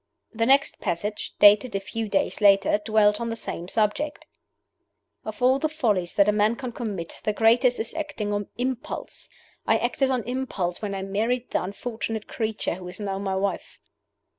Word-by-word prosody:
The 230 0 0
next 275 +1 +3
passage, 205 +5 -3
dated 205 +3 +6
a - - +1
few 220 +2 -5
days 200 +2 0
later, 200 0 +5
dwelt 210 0 +3
on 230 - -2
the 225 - -3
same 175 -6 -5
subject. 220 +9 -1 1.0
"Of 220 +3 -6
all 260 +2 +4
the 310 - 0
follies 215 - 0
that 200 0 +4
a - - +5
man 210 +2 +2
can 255 -1 -5
commit, 205 -8 -5
the 215 - 0
greatest 240 +3 +4
is 220 - -3
acting 295 -10 -3
on 205 -1 -2
impulse. 250 0 -4 0.4
I - - +4
acted 255 +3 0
on 255 -3 0
impulse 235 -8 -3
when 205 -2 -3
I 190 - -4
married 225 +6 -1
the - - +1
unfortunate 220 +2 -5
creature 220 -2 -2
who 180 +1 -8
is 180 +2 -4
now 195 -2 -3
my 195 -1 -2
wife. 195 +1 -3
215 Hz, 180 wpm, -25 LUFS, 200-245 Hz, 1.0 s, dated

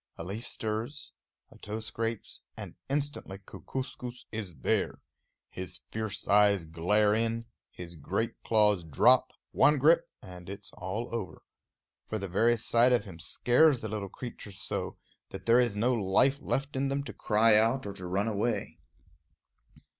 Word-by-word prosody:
A - - -6
leaf 100 +7 -5
stirs, 115 +6 -4 0.4
a - - -17
toe 105 +1 -5
scrapes, 115 0 -4 0.2
and - - -8 0.2
instantly 140 -8 -3
Kookooskoos 125 +3 -7
is 105 -6 -5
there. 65 - 0 0.5
His 95 0 -6
fierce 110 -2 -4
eyes 100 -3 +4
glare 105 +6 +2
in; 115 +1 -1 0.2
his 85 -1 -9
great 95 +9 -2
claws 105 -5 +3
drop; 80 -3 +4 0.2
one 150 0 +4
grip, 165 +5 +4
and 90 -2 -11
it's 100 +1 -9
all 105 +6 -5
over. 95 -9 -5 0.6
For 110 - -2
the 100 -1 -4
very 115 +6 +3
sight 120 +2 +3
of 120 -2 +2
him 90 -4 -10
scares 125 - +4
the 110 - -4
little 100 -2 -4
creatures 105 -3 -8
so, - - -3 0.3
that - - -9
there 115 +1 +5
is 120 -4 +2
no 120 +5 +2
life 120 +6 +3
left 140 +1 -2
in 135 +1 0
them 140 +1 -1
to - - -8
cry 110 0 +3
out 115 +4 +3
or 100 - -5
to 90 -2 -7
run 100 +4 0
away. 110 +2 -2
110 Hz, 155 wpm, -30 LUFS, 100-120 Hz, 0.6 s, there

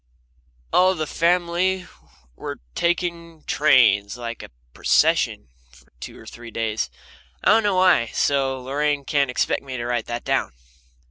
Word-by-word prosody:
All 185 +1 +4
the 155 -2 -2
family 175 +3 +1 0.5
were - - -7
taking 170 -2 -2
trains, 115 -8 +3
like 115 -1 -6
a - - -10 0.2
procession, 65 - +2 0.2
for 65 0 -22
two - - -9
or - - -14
three 120 0 -10
days. 110 -1 -2 0.5
I - - +3
don't 225 +1 +5
know 205 -3 +1
why, 185 -10 +4
so 135 +1 0
Lorraine 145 +1 -1
can't 140 -2 +1
expect 125 - 0
me 130 -2 -7
to 120 - -4
write 120 -2 -2
that 120 0 -4
down. - - -1
140 Hz, 145 wpm, -22 LUFS, 120-170 Hz, 0.5 s, don't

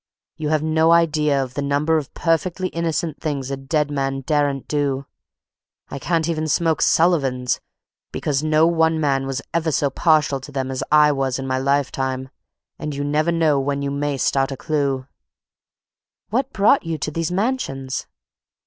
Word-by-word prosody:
You 155 -2 -3
have 155 -1 +1
no 160 +1 +3
idea 150 -4 +3
of 130 -1 -8
the 145 - -3
number 145 +3 +1
of 150 -4 -4
perfectly 175 +2 0
innocent 165 -2 -2
things 140 -4 -3
a - - -1
dead 145 +2 -1
man 135 -1 -1
daren't 145 -1 0
do. 140 -2 -1 0.8
I 140 - -6
can't 165 +1 0
even 160 -2 -1
smoke 160 +1 +1
Sullivans, 135 -8 +2 0.5
because 140 -2 -1
no 155 +1 +4
one 160 -1 +2
man 135 -3 +1
was 135 0 -3
ever 165 -1 +1
so 140 0 +1
partial 155 -4 +2
to 135 +3 -11
them 135 -1 -3
as 130 - -3
I 150 0 +6
was 135 -2 -1
in 135 - -5
my 130 0 -1
lifetime, 130 -1 -1 0.5
and 150 -1 -4
you 140 - -2
never 150 +3 +1
know 160 -4 +2
when 140 +1 -1
you 140 - -2
may 140 0 -1
start 135 +1 +1
a 135 - -5
clew." 140 -4 -1 1.3
"What 260 +4 0
brought 215 +6 +3
you 165 -2 -3
to 150 - -3
these 165 +2 -2
mansions?" 180 - -2
145 Hz, 170 wpm, -21 LUFS, 135-160 Hz, 1.3 s, I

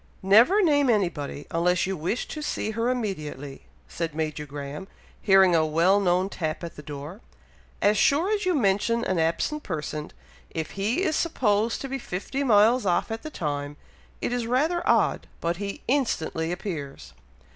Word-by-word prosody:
"Never 235 - +6
name 290 -5 +3
anybody, 170 - -1
unless 175 +2 +2
you 190 +1 -2
wish 175 +9 -2
to 305 - -5
see 220 -6 -2
her 230 +2 -1
immediately," 155 - -4 0.2
said 165 -3 -4
Major 155 -1 -3
Graham, 145 +5 -7 0.3
hearing 190 -3 +5
a 160 - +4
well 165 +6 +3
known 185 -1 +2
tap 160 -4 -4
at 170 - -6
the - - -9
door. 150 +7 -8 0.6
"As 205 +1 +4
sure 335 +9 +3
as 420 -1 -1
you 365 -1 +1
mention 230 0 +1
an 185 -3 0
absent 165 - 0
person, 155 - -4 0.4
if 160 -1 -4
he 215 - -1
is 315 -5 +1
supposed 225 -9 +1
to 275 - -4
be 270 0 -4
fifty 240 +6 -4
miles 230 +1 +4
off 180 +2 0
at 225 0 -4
the 310 - -6
time, 145 - -4 0.5
it - - -1
is 245 -2 -2
rather 305 +8 +1
odd, - - +2
but 170 +1 -1
he 200 0 -5
instantly 170 - 0
appears!" 165 -7 -6
195 Hz, 165 wpm, -26 LUFS, 160-245 Hz, 0.6 s, Never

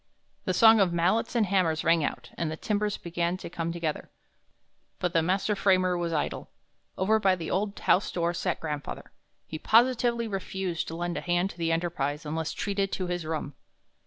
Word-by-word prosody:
The 185 - 0
song 225 +3 +7
of 190 -3 +3
mallets 185 +8 +1
and 230 -3 +3
hammers 180 -5 +1
rang 165 -1 +3
out, - - -4
and 165 - -2
the 160 - -5
timbers 210 +1 -1
began 170 +1 -2
to 175 - -9
come 165 -1 -3
together; 165 -3 -3 0.9
but 180 -1 -2
the 165 - +4
master 190 +5 +1
framer 185 -2 +3
was 170 -1 -2
idle. 150 -2 -2 0.5
Over 215 +4 +3
by 195 -3 +3
the 165 -3 -5
old 200 +2 -1
house 190 - +2
door 170 0 0
sat 175 0 -2
grandfather. 150 -2 -5 0.3
He 155 - -6
positively 235 +1 +3
refused 190 -3 -3
to 165 - -5
lend 175 0 -3
a - - -3
hand 175 +2 0
to - - -16
the 165 -1 0
enterprise 160 -3 -1
unless 160 +1 -2
treated 200 -1 -2
to 185 - -2
his 175 -2 -3
rum. 155 -3 -3
175 Hz, 190 wpm, -28 LUFS, 165-195 Hz, 0.9 s, song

